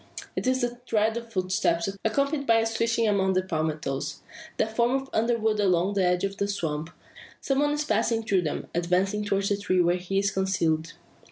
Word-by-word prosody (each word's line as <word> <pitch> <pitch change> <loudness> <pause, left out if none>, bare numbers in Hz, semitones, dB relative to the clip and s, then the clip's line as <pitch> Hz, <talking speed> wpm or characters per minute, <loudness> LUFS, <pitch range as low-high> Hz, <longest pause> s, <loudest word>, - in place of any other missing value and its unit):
It - - -2
is 260 0 +2
the 240 0 -2
tread 220 0 +2
of 235 -1 -6
footsteps, 185 -3 0 0.2
accompanied 280 +5 0
by 230 - +5
a 225 0 +3
swishing 230 0 +1
among 190 -2 +2
the 185 0 +1
palmettoes, 150 -4 -3 0.3
that 220 0 -1
form 245 +3 +2
an 270 - -12
underwood 220 -1 +1
along 190 -1 +2
the 195 -2 +1
edge 180 0 +2
of 195 0 -2
the 200 - 0
swamp. 160 -6 -3 0.5
Some 270 0 0
one 290 0 +2
is 295 0 -1
passing 225 -1 +1
through 195 -4 +2
them, 155 -4 -3
advancing 185 +4 +1
towards 200 -1 0
the 205 - +1
tree 185 -2 0
where 175 0 +3
he 185 +2 -3
is 200 0 +2
concealed. 165 -5 0
200 Hz, 195 wpm, -26 LUFS, 180-230 Hz, 0.5 s, by